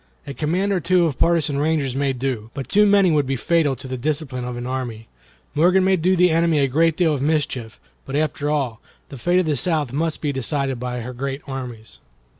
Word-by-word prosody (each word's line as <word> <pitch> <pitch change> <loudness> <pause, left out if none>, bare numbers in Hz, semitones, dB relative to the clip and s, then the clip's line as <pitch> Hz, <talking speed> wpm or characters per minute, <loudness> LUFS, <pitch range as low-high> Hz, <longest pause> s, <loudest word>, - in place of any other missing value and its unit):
A 140 - -6
command 180 +8 0
or 185 - +1
two 175 +1 +3
of 145 -6 -2
partisan 160 -4 +2
rangers 145 -4 0
may 140 0 +1
do, 125 -4 -3
but 135 -4 -5
too 210 +1 +4
many 200 -3 +5
would 145 -3 +2
be 135 - 0
fatal 155 +1 +1
to 130 +2 -9
the 130 0 -4
discipline 140 -3 -2
of 125 -1 -5
an 120 - -5
army. 125 -4 -4 0.5
Morgan 180 +5 +4
may 190 0 +4
do 185 +2 +2
the 180 -1 +4
enemy 165 -1 +2
a 140 -1 +3
great 160 +4 +2
deal 165 -4 +3
of 140 - -2
mischief, 140 -6 -1 0.3
but 135 - -4
after 150 -1 -1
all, 135 -7 -1 0.3
the 135 - -9
fate 175 +7 +2
of 185 - +3
the 155 -2 +1
South 150 -2 0
must 160 +2 -1
be 150 - -1
decided 135 -1 -1
by 125 0 -4
her 125 +2 -6
great 135 +3 -4
armies." 125 -5 -8
145 Hz, 225 wpm, -21 LUFS, 130-165 Hz, 0.5 s, many